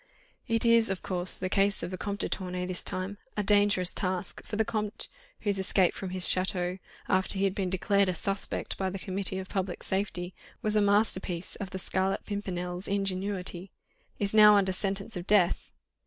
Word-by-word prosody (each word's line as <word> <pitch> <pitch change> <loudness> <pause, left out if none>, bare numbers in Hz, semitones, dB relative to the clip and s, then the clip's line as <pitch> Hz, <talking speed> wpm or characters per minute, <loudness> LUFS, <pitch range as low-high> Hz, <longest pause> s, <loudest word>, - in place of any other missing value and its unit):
"It 230 -1 +1
is, 230 -1 +5
of 195 -2 -3
course, 180 -1 +1
the 185 - -3
case 195 +1 +2
of 175 - -4
the 185 - -4
Comte 200 0 -3
de - - +1
Tournay, 180 -1 -3
this 180 -1 -2
time; 185 +2 -4 0.2
a 210 - +1
dangerous 205 -3 +3
task, 185 -1 -3
for 215 - -6
the 220 +1 +1
Comte, 210 -2 +1 0.3
whose 200 -2 +2
escape 190 -1 +3
from 190 - -6
his 185 0 +3
château, 185 0 +1 0.3
after 190 +1 +1
he 195 - 0
had 195 -1 +2
been 190 -2 -2
declared 200 +1 +2
a 180 - -1
'suspect' 195 +4 -3
by 190 -1 0
the 190 - -5
Committee 190 0 -2
of 190 0 -5
Public 190 -2 -3
Safety, 190 -2 -2 0.3
was 215 0 +1
a 210 - +4
masterpiece 200 -4 +1
of 200 - -5
the 190 - -5
Scarlet 190 +1 -1
Pimpernel's 180 -3 -4
ingenuity, 195 -2 -2 0.5
is 200 0 -1
now 210 -1 +8
under 195 -2 +3
sentence 195 +3 -2
of 180 +1 -6
death. 195 -4 +3
195 Hz, 190 wpm, -29 LUFS, 185-205 Hz, 0.5 s, now